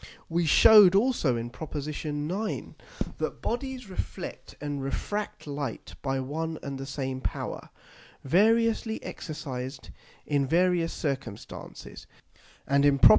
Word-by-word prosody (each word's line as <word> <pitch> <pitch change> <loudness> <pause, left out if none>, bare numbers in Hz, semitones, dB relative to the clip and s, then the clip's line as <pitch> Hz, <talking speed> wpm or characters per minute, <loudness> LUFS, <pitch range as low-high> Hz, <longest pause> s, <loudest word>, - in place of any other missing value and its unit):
We 170 0 +1
shewed 205 +3 +9
also 200 - +3
in 115 +1 -4
Prop. 155 +4 -8
9. 150 +7 -3 0.4
that - - -2
Bodies 255 -1 -3
reflect 185 - -6
and 145 -1 -3
refract 205 +9 -3
Light 140 -5 -4
by 135 -1 0
one 160 +5 -3
and 140 -1 -4
the 135 - -5
same 135 -1 -3
power, - - -4 0.5
variously 220 - +3
exercised 135 -5 -6 0.3
in 140 -2 +1
various 175 +1 +3
circumstances; 135 -8 -5 0.6
and 140 0 +3
in 145 -1 +5
_Prop. 120 - +9
150 Hz, 120 wpm, -28 LUFS, 135-190 Hz, 0.6 s, shewed